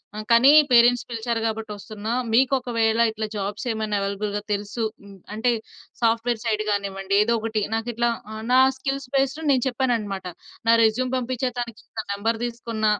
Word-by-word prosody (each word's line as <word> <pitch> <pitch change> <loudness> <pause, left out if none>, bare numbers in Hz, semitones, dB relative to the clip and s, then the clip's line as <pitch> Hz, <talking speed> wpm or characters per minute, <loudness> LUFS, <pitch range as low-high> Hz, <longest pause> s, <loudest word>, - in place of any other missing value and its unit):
ఆహ్, 215 - -6
కానీ 245 +5 +7 0.2
పేరెంట్స్ 240 0 +5
పిలిచారు 230 0 -2
కాబట్టి 220 -1 -4
ఒస్తున్న. 210 +1 -9 0.3
మీకొకవేళ 240 -3 +2
ఇట్లా 220 0 -4
జాబ్స్ 205 +5 -4
ఏమైనా 215 -1 -2
అవైలబుల్‌గా 205 +1 -2
తెలుసు 205 +3 -3 0.5
అంటే 240 +3 +1 0.5
సాఫ్ట్‌వేర్ 230 0 +1
సైడ్ 215 -1 0
గానివ్వండి 200 -1 -2
ఏదో 235 +1 +1
ఒకటి. 220 -1 -2
నాకు 225 +2 -3
ఇట్లా 235 +1 +1 0.4
నా 260 - +7 0.2
స్కిల్స్ 270 0 -4
బేస్డ్ 270 +3 +1
నేను 255 -3 +2
చెప్పానన్నమాట. 225 -7 -1 0.4
నా 230 - +7
రెస్యూమ్ 245 +3 +1
పంపిచా 250 0 -2
తనకి, 235 -2 -7 0.2
తన 220 - -3
నంబర్ 225 +3 -1
తీసుకున్న 230 -2 -4
225 Hz, 150 wpm, -23 LUFS, 215-245 Hz, 0.5 s, కానీ